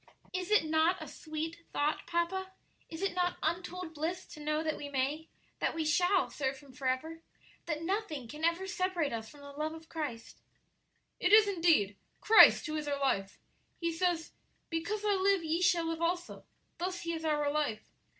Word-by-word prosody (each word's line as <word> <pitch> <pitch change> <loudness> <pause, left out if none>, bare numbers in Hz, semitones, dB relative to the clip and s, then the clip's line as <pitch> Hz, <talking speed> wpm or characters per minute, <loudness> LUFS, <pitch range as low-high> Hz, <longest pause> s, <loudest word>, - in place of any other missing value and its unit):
Is 365 0 -3
it 425 -6 +4
not 320 +3 +2
a - - -7
sweet 320 +2 -6
thought, 295 +1 -1
papa? 375 +3 -1 0.4
is 325 +3 -6
it 395 - 0
not 355 0 0
untold 350 +1 -2
bliss 330 +4 -3
to 310 - -10
know 305 +1 -1
that 315 -1 -1
we 290 - -7
may 285 +4 -1 0.3
that - - 0
we 320 -1 -1
shall 355 +5 +3
serve 270 -1 -2
Him 275 -2 -16
forever? 275 +5 -2 0.5
that 310 -1 -2
nothing 365 - -2
can 300 +6 -9
ever 335 +3 +2
separate 365 -7 -1
us 225 -1 -5
from 290 - -15
the 285 0 -10
love 305 +2 -3
of 320 0 -13
Christ?" 295 -8 -5 0.8
"It 360 - +2
is, 425 0 +8
indeed 330 - +3 0.2
Christ 440 0 +8
who 310 -1 -3
is 300 -1 -4
our 285 -1 -1
life. 195 -8 0 0.4
He 335 -1 0
says, 335 -1 0 0.4
'Because 405 +6 -2
I 415 - +3
live, 390 -1 +2
ye 325 +2 0
shall 350 -2 +3
live 330 0 -3
also;' 350 +1 -2 0.3
thus 360 0 -2
He 335 0 -3
is 320 -1 -4
our 295 -2 +1
life. 290 -8 -2
325 Hz, 185 wpm, -32 LUFS, 295-360 Hz, 0.8 s, is